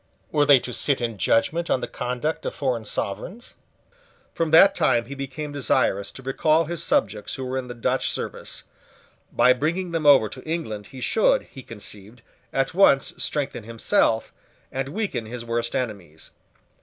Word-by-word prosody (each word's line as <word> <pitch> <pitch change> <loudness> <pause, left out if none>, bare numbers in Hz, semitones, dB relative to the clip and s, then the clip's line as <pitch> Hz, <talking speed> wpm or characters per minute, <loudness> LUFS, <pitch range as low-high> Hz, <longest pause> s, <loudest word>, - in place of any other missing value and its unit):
Were 145 -1 +2
they 140 - +8
to 125 - -6
sit 140 +2 +1
in 115 -4 -3
judgment 160 - +1
on - - +2
the - - -4
conduct 125 +5 -3
of - - -4
foreign 125 -5 -1
sovereigns? 115 - -5 0.8
From 165 -1 -1
that 180 +5 +7
time 120 0 +2
he 135 - -8
became 140 +2 -6
desirous 100 -8 0
to 135 - -11
recall 155 +5 +2
his 170 +1 -3
subjects 105 -1 0
who 130 - -5
were 130 +1 -3
in 130 -1 -3
the 120 - -7
Dutch 115 - 0
service. - - -5 0.7
By 125 - +5
bringing 170 +7 -2
them 165 -3 0
over 135 -6 +7
to - - -10
England 130 -11 -4
he 130 - -11
should, - - +3
he 135 - -9
conceived, 110 0 -10 0.3
at 135 +2 0
once 165 -7 +4
strengthen 140 -6 -2
himself, 115 0 +1 0.4
and 135 +1 -3
weaken 180 - -3
his 120 +1 -6
worst 120 0 -2
enemies. 100 -11 -5
130 Hz, 170 wpm, -24 LUFS, 115-155 Hz, 0.8 s, they